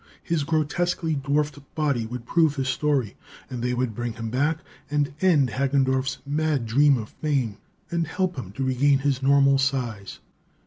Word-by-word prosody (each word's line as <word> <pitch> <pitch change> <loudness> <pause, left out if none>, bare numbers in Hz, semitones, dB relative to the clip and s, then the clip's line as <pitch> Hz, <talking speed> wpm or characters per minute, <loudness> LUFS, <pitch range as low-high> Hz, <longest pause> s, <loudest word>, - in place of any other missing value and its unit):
His 165 -3 0
grotesquely 160 +2 0
dwarfed 145 0 -1 0.2
body 140 -7 0
would 120 0 -7
prove 160 +1 +2
his 135 -2 -2
story, 135 -6 0 0.4
and 125 -2 -4
they 125 +1 0
would 125 -2 -1
bring 120 +1 -3
him 115 -1 -5
back 145 +5 +1 0.3
and 145 -1 0
end 155 -9 +4
Hagendorff's 135 0 +1
mad 145 -3 0
dream 140 +5 +4
of 110 -2 -6
fame, 135 -9 -1 0.3
and 170 -2 0
help 185 +2 -1
him 120 -9 -6
to 135 - -3
regain 135 +2 +3
his 135 -1 0
normal 140 0 +4
size. 125 -7 -2
140 Hz, 165 wpm, -25 LUFS, 125-150 Hz, 0.4 s, end